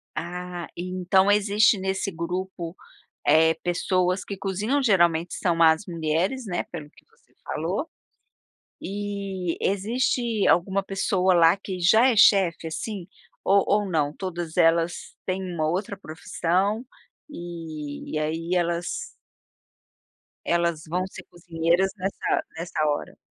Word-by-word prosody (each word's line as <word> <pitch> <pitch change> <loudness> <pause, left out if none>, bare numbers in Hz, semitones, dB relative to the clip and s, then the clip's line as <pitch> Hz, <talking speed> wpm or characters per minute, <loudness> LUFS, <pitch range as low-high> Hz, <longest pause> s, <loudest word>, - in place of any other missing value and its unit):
Ah, 175 0 -5
então 185 +2 +1
existe, 210 +1 +4
nesse 190 +1 -2
grupo, 175 0 -4 0.5
eh, 160 +2 +5
pessoas 180 +1 0
que 200 - -6
cozinham 205 +9 -1
geralmente 175 -7 +3
são 170 -2 +1
as 160 +4 +5
mulheres, 170 +8 -1
né, 175 -2 -2
pelo 155 -4 -9
que - - -22
você - - -32
falou, - - -2 0.9
e 195 -2 -4
existe 225 +2 0
alguma 190 +3 +3
pessoa 190 -1 +1
lá 170 +1 +6
que 195 -1 -6
já 220 +8 +5
é 235 - +2
chef, 190 -6 +5
assim, 190 +3 -5 0.4
ou 200 0 +4
ou 205 -1 +2
não? 150 -4 0
Todas 175 -4 -5
elas 170 0 +2
têm 185 0 -1
uma 155 -2 0
outra 195 +4 -2
profissão 185 +5 -1 0.5
e 160 - -7
e - - +1
aí 165 +3 -2
elas 170 -1 -1 1.4
elas 170 -2 +1
vão 180 +3 -1
ser - - -10
cozinheiras 170 +2 0
nessa 190 +1 -1
nessa 165 -2 -2
hora? 145 - -2
180 Hz, 125 wpm, -25 LUFS, 165-195 Hz, 1.4 s, lá